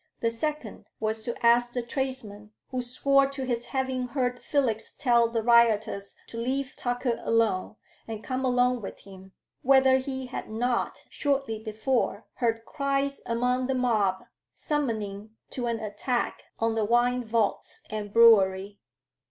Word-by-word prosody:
The 230 - +1
second 295 -1 -4
was 220 0 -2
to 235 0 -3
ask 240 +1 +4
the 245 - -2
tradesman 235 -5 -5 0.2
who 255 -1 -1
swore 275 +3 +3
to 275 -1 -5
his 240 -2 -1
having 260 -1 -2
heard 250 -1 -1
Felix 245 -7 0
tell 235 -4 +4
the 230 -1 -2
rioters 220 -4 +3
to 230 - -8
leave 265 +3 -2
Tucker 245 -1 -1
alone 220 -3 +1 0.3
and 220 -1 -6
come 260 0 -2
along 250 -1 +2
with 195 - -8
him, 190 -1 -14 0.3
whether 265 0 +5
he 265 0 -4
had 250 - -6
not, 240 +2 -1
shortly 275 -6 -1
before, 220 +1 -1
heard 225 -2 0
cries 275 -1 -1
among 250 +2 0
the 265 - 0
mob 215 -7 +1 0.3
summoning 220 -7 -3 0.2
to 245 -2 -3
an 230 -1 -1
attack 220 +3 -2
on 225 0 +1
the 225 -1 0
wine 240 +3 +2
vaults 220 -2 -1
and 210 -1 -4
brewery. 200 -3 +5
240 Hz, 145 wpm, -27 LUFS, 220-260 Hz, 0.3 s, whether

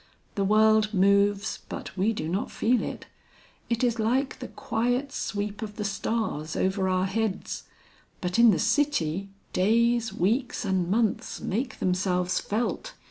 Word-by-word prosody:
The 200 - 0
world 215 +1 +4
moves, 200 +2 +3
but - - -7
we 200 +4 +2
do 155 -8 -3
not 185 +5 -2
feel 240 +2 +1
it; - - -5 0.6
it 235 +1 0
is 235 -2 +1
like 260 +5 0
the 255 - -6
quiet 245 +5 -1
sweep 210 -4 -3
of 210 -2 -6
the 210 - -3
stars 195 -6 -2
over 190 0 +1
our 185 0 +1
heads. 205 0 -2 0.5
But 180 +4 -1
in 235 0 +8
the 190 - +4
city, 205 - +1 0.2
days, 230 +3 +2
weeks 225 +6 0
and 185 -3 0
months 215 0 0
make 245 +7 -3
themselves 180 -1 0
felt. 245 - -3
210 Hz, 145 wpm, -27 LUFS, 190-235 Hz, 0.6 s, in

